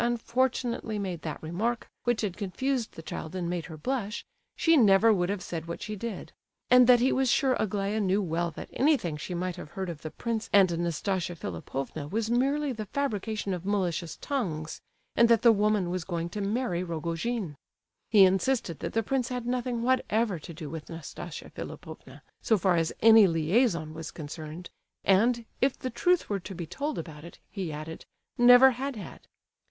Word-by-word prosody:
unfortunately 240 Hz, -1 st, 0 dB
made 185 Hz, -5 st, -4 dB
that 155 Hz, -2 st, -4 dB
remark, 215 Hz, +9 st, -2 dB, 0.2 s
which 240 Hz, -2 st, +1 dB
had 200 Hz, -5 st, -2 dB
confused 240 Hz, +5 st, -2 dB
the 165 Hz, -, -10 dB
child 160 Hz, +2 st, -6 dB
and 180 Hz, -2 st, -2 dB
made 175 Hz, -1 st, -3 dB
her 160 Hz, -2 st, -9 dB
blush, 225 Hz, -, -3 dB, 0.3 s
she 330 Hz, 0 st, +4 dB
never 220 Hz, -3 st, +6 dB
would 180 Hz, -2 st, 0 dB
have 200 Hz, -2 st, -2 dB
said 165 Hz, -1 st, -5 dB
what 170 Hz, -, -5 dB
she 210 Hz, 0 st, -5 dB
did; 215 Hz, -1 st, -6 dB, 0.4 s
and 250 Hz, -1 st, +8 dB
that 250 Hz, -1 st, +7 dB
he 255 Hz, +3 st, +3 dB
was 265 Hz, -1 st, +2 dB
sure 265 Hz, +1 st, +3 dB
Aglaya 205 Hz, +1 st, -1 dB
knew 195 Hz, -1 st, +2 dB
well 170 Hz, -2 st, -1 dB
that -, -, -9 dB
anything 260 Hz, -, +2 dB
she 165 Hz, +4 st, -5 dB
might 180 Hz, 0 st, -3 dB
have 150 Hz, -, -8 dB
heard 190 Hz, +1 st, -4 dB
of 155 Hz, -3 st, -10 dB
the 155 Hz, -, -5 dB
prince 225 Hz, +5 st, -3 dB
and 190 Hz, -4 st, +5 dB
Nastasia 175 Hz, +1 st, -1 dB
Philipovna 135 Hz, -, -5 dB
was 220 Hz, +6 st, -2 dB
merely 275 Hz, +4 st, +1 dB
the 215 Hz, -3 st, -6 dB
fabrication 215 Hz, -5 st, -2 dB
of 180 Hz, -2 st, -4 dB
malicious 180 Hz, -4 st, -1 dB
tongues, 165 Hz, -, -3 dB, 0.3 s
and 235 Hz, 0 st, +5 dB
that 230 Hz, -2 st, +4 dB
the 235 Hz, -, +8 dB
woman 210 Hz, -4 st, +1 dB
was 180 Hz, -2 st, -2 dB
going 170 Hz, -2 st, -3 dB
to 205 Hz, +4 st, -5 dB
marry 200 Hz, -3 st, -1 dB
Rogojin. 170 Hz, +3 st, -3 dB, 0.5 s
He 210 Hz, -4 st, +7 dB
insisted 190 Hz, -, +1 dB
that -, -, -4 dB
the 225 Hz, -, +1 dB
prince 255 Hz, +1 st, -1 dB
had 250 Hz, -2 st, -4 dB
nothing 245 Hz, -1 st, -1 dB
whatever 230 Hz, -6 st, +1 dB
to 155 Hz, -, -10 dB
do 160 Hz, -1 st, -7 dB
with 160 Hz, 0 st, -7 dB
Nastasia 165 Hz, 0 st, -8 dB
Philipovna, 155 Hz, -3 st, -9 dB, 0.2 s
so 220 Hz, -, +3 dB
far 185 Hz, -1 st, +2 dB
as 165 Hz, -1 st, +1 dB
any 225 Hz, -2 st, +8 dB
liaison 165 Hz, 0 st, +1 dB
was 160 Hz, 0 st, -6 dB
concerned; 155 Hz, +2 st, -8 dB, 0.3 s
and, 230 Hz, +5 st, +3 dB, 0.2 s
if 270 Hz, 0 st, +2 dB
the 255 Hz, -, -4 dB
truth 360 Hz, +8 st, +2 dB
were 200 Hz, -1 st, -1 dB
to 190 Hz, +1 st, -8 dB
be 170 Hz, -1 st, -5 dB
told 290 Hz, -, -4 dB
about 155 Hz, -2 st, -7 dB
it, 170 Hz, -, -11 dB
he 190 Hz, -6 st, -4 dB
added, 155 Hz, +2 st, -7 dB, 0.3 s
never 245 Hz, +2 st, +8 dB
had 265 Hz, +2 st, -4 dB
had. 200 Hz, -6 st, -10 dB
200 Hz, 185 wpm, -28 LUFS, 170-235 Hz, 0.5 s, and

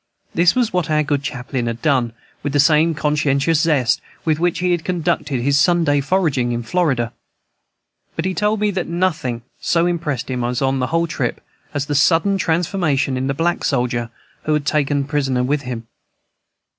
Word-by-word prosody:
This 170 Hz, +5 st, +4 dB
was 245 Hz, -5 st, +1 dB
what 180 Hz, -4 st, 0 dB
our 155 Hz, 0 st, +2 dB
good 145 Hz, -1 st, 0 dB
chaplain 125 Hz, -2 st, -3 dB
had 115 Hz, 0 st, -3 dB
done, 130 Hz, -6 st, +2 dB, 0.3 s
with 145 Hz, -1 st, -3 dB
the 145 Hz, -, +2 dB
same 155 Hz, +3 st, +4 dB
conscientious 150 Hz, +1 st, +1 dB
zest 150 Hz, -8 st, +2 dB, 0.2 s
with 155 Hz, -1 st, +1 dB
which 175 Hz, 0 st, +1 dB
he 180 Hz, +1 st, 0 dB
had 175 Hz, -2 st, 0 dB
conducted 155 Hz, -7 st, -1 dB
his 140 Hz, +1 st, +3 dB
Sunday 165 Hz, -3 st, +3 dB
foraging 140 Hz, -7 st, +1 dB
in 120 Hz, 0 st, -3 dB
Florida. 125 Hz, -4 st, 0 dB, 1.0 s
But 165 Hz, -, -2 dB
he 190 Hz, -, 0 dB
told 210 Hz, +2 st, 0 dB
me 210 Hz, -1 st, +2 dB
that 185 Hz, -2 st, -2 dB
nothing 160 Hz, -9 st, -1 dB, 0.2 s
so 170 Hz, 0 st, +1 dB
impressed 160 Hz, -8 st, -2 dB
him 125 Hz, -1 st, -2 dB
on 130 Hz, +2 st, 0 dB
the 125 Hz, -, 0 dB
whole 165 Hz, +3 st, +1 dB
trip 160 Hz, -, -2 dB, 0.3 s
as 145 Hz, -1 st, -2 dB
the 145 Hz, -, -3 dB
sudden 170 Hz, +7 st, +3 dB
transformation 160 Hz, -6 st, 0 dB
in 130 Hz, +1 st, -1 dB
the 135 Hz, -, -1 dB
black 170 Hz, +4 st, 0 dB
soldier 120 Hz, -3 st, 0 dB, 0.4 s
who 155 Hz, -, +1 dB
was 150 Hz, -1 st, +1 dB
taken 145 Hz, -1 st, +1 dB
prisoner 135 Hz, -3 st, 0 dB
with 140 Hz, +3 st, 0 dB
him. 125 Hz, -4 st, -6 dB
150 Hz, 180 wpm, -19 LUFS, 135-170 Hz, 1.0 s, This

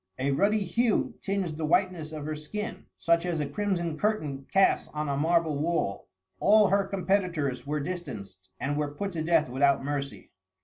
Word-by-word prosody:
A 135 Hz, +2 st, 0 dB
ruddy 205 Hz, +8 st, +2 dB
hue 230 Hz, +6 st, +1 dB
tinged 195 Hz, -6 st, -2 dB
the 160 Hz, -, -1 dB
whiteness 175 Hz, -3 st, +1 dB
of 155 Hz, -2 st, -6 dB
her 155 Hz, 0 st, -3 dB
skin, 210 Hz, +9 st, -6 dB
such 170 Hz, 0 st, +2 dB
as 175 Hz, -3 st, -1 dB
a 150 Hz, -, 0 dB
crimson 170 Hz, -1 st, -2 dB
curtain 150 Hz, -11 st, -1 dB
casts 195 Hz, 0 st, +3 dB
on 150 Hz, 0 st, -2 dB
a 140 Hz, -, 0 dB
marble 160 Hz, 0 st, +2 dB
wall. 155 Hz, -11 st, -1 dB, 0.3 s
All 210 Hz, 0 st, +5 dB
her 200 Hz, +1 st, +3 dB
competitors 180 Hz, -9 st, -1 dB
were 150 Hz, +1 st, -1 dB
distanced, 110 Hz, -, -6 dB
and 145 Hz, +2 st, -1 dB
were 145 Hz, -1 st, -2 dB
put 200 Hz, +5 st, -3 dB
to 165 Hz, -3 st, -3 dB
death 160 Hz, -2 st, +3 dB
without 135 Hz, +2 st, +2 dB
mercy. 140 Hz, -1 st, -4 dB
160 Hz, 175 wpm, -28 LUFS, 145-190 Hz, 0.3 s, All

